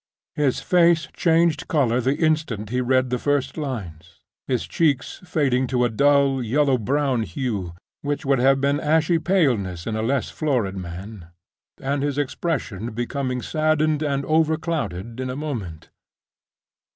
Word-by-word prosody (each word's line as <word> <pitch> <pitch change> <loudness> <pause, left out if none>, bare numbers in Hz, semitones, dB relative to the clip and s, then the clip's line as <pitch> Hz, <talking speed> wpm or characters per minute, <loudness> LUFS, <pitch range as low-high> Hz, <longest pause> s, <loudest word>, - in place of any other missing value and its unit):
His 145 -4 0
face 170 -4 +3
changed 165 -1 +2
color 130 -5 +2
the 130 +4 +1
instant 155 - 0
he 125 0 +1
read 130 0 +1
the 125 - 0
first 145 0 0
lines; 90 - -6 0.3
his 125 -3 0
cheeks 145 -5 0
fading 135 -7 +1
to 125 -1 +1
a - - +1
dull, 140 +2 +3
yellow 135 +2 +2
brown 135 +1 0
hue, 100 -3 -3 0.3
which 145 0 -3
would 135 -1 +2
have 135 +2 +4
been 140 +1 +1
ashy 160 +2 +2
paleness 120 - +1
in 110 - -2
a 110 - -1
less 130 +4 -1
florid 125 -11 -1
man; 90 +1 -8 0.5
and 140 +1 -1
his 145 -1 -1
expression 130 - -2
becoming 125 +2 -3
saddened 155 -1 +1
and 140 -2 0
overclouded 155 - -1
in 130 0 -3
a 125 - -4
moment. 115 - -6
135 Hz, 145 wpm, -23 LUFS, 115-150 Hz, 0.5 s, have